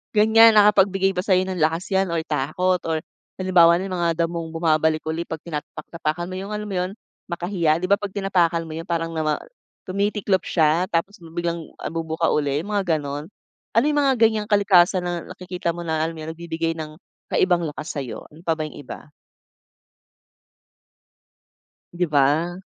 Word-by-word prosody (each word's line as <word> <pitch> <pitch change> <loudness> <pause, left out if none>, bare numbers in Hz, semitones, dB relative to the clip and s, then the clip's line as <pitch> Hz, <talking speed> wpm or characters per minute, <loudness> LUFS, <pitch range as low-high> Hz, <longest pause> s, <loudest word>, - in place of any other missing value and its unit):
ganyan, 220 +1 +7
nakapagbigay 195 -2 +4
ba - - -1
sayo 185 0 +2
ng 185 -1 -4
lakas 165 +5 0
'yan 190 0 +2
or 165 - 0
takot 160 +6 0
or, 160 -1 -1 0.4
halimbawa 175 -3 +6
nalang 190 -1 -4
mga 170 -1 +1 0.2
damong 165 -1 -5
bumabalik 160 -1 +2
uli 160 +2 -2
'pag 160 -2 -6
tinatapak-tapakan 160 +1 -4
mo, 185 - -6
'yong 195 +3 -5
alam 210 0 -4
mo 195 - -4
'yon? 180 +1 -1 0.4
Makahiya, 170 -2 0
'di 185 - -1
ba 200 - +6
'pag 205 -1 -5
tinapakan 175 -4 +1
mo 155 - -6
'yon 165 - -5
parang 165 -2 -1
nama 155 -1 0 0.5
tumitiklop 200 0 0
siya 160 +1 +2
tapos 180 +5 -1 0.2
biglang, 170 -1 -2 0.2
ah, - - -3
bubuka 165 0 -1
uli 145 -1 +1
yung 195 - -9
mga 175 -6 +1
ganun. 145 +4 -6 0.4
Ano 230 - +4
'yong 300 -1 +1
mga 270 -1 +4
ganyang 220 -2 +3
kalikasan 190 -2 +4
na 175 0 -2
nakikita 180 -2 -4
mo 175 - -8
na 160 -2 -1
alam 165 - -3
mo 160 - -9
yun? 155 - -6
Nagbibigay 165 -1 -3
ng 155 -1 -6 0.4
kaibang 175 -2 +2
lakas 155 +1 -6
sayo? 135 -4 -6
Ano 155 +3 -16
pa 165 - +1
ba 160 - -5
'yong - - -12
iba? 150 - -10 2.8
'Di 180 +1 0
ba? 155 +5 +2
170 Hz, 175 wpm, -23 LUFS, 160-190 Hz, 2.8 s, ganyan